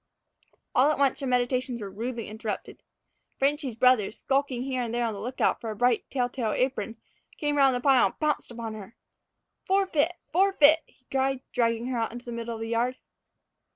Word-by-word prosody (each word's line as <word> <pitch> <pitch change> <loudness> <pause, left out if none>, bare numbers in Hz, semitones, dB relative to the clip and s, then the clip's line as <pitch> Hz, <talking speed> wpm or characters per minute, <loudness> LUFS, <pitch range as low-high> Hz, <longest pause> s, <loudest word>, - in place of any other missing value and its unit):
All 265 +4 +5
at - - -1
once 275 -2 +2
her 275 - -3
meditations 250 0 0
were 200 -3 -6
rudely 230 +2 -4
interrupted. 220 0 -6 0.6
"Frenchy's" 275 -3 0
brother, 245 -3 +4
skulking 270 +1 -1
here 260 -1 -2
and 235 -2 -3
there 240 0 0
on 225 - -1
the 200 - -7
lookout 250 +4 0
for 230 - -4
a 215 - -4
bright, 245 +2 +1
telltale 245 -3 -1
apron, 230 -4 -1 0.4
came 295 -1 -1
round 270 -3 +4
the 245 - -2
pile 265 -5 +5
and - - -11
pounced 305 -1 0
upon 230 -2 -6
her. 215 +1 -10 0.7
"Forfeet! 370 -4 +2 0.2
forfeet!" 335 -4 +5
he 255 - -29
cried, 270 -1 0
dragging 230 -1 +1
her 250 -2 -1
out 225 - -1
into 240 +1 -9
the 240 - -6
middle 235 0 -4
of 225 - -8
the 225 - -3
yard. 240 +2 0
250 Hz, 190 wpm, -27 LUFS, 230-270 Hz, 0.7 s, All